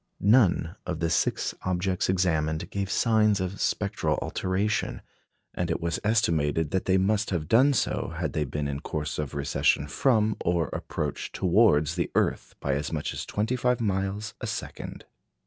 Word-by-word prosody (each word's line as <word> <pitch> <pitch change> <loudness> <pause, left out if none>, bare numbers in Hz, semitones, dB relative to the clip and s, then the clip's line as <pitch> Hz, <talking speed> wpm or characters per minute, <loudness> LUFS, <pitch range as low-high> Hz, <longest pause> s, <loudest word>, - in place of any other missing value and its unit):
None 100 -6 +4
of 90 -3 -3
the 85 0 0
six - - +1
objects 90 0 0
examined 80 -4 0
gave 100 -1 -2
signs 110 -2 +3
of 95 +1 -3
spectral - - 0
alteration, 100 +3 -1 0.5
and 90 -1 -2
it 80 - 0
was 85 0 -2
estimated 80 -8 +1
that 95 - 0
they 95 0 +3
must 100 +3 +1
have 85 -5 -2
done 130 - +5
so - - -1
had - - -2
they 75 - 0
been 75 +1 -3
in 70 0 -3
course 75 -3 -4
of 75 -1 -4
recession 70 0 +1
from 110 - +2
or 85 -3 +1
approach - - -4
towards 85 -5 +3
the 85 0 -1
earth - - 0
by 70 - -1
as 70 +1 -2
much 75 -3 -2
as - - -5
twenty 110 +4 -1
five 125 0 +1
miles 100 0 -2
a - - -3
second. - - -6
90 Hz, 165 wpm, -27 LUFS, 80-105 Hz, 0.5 s, done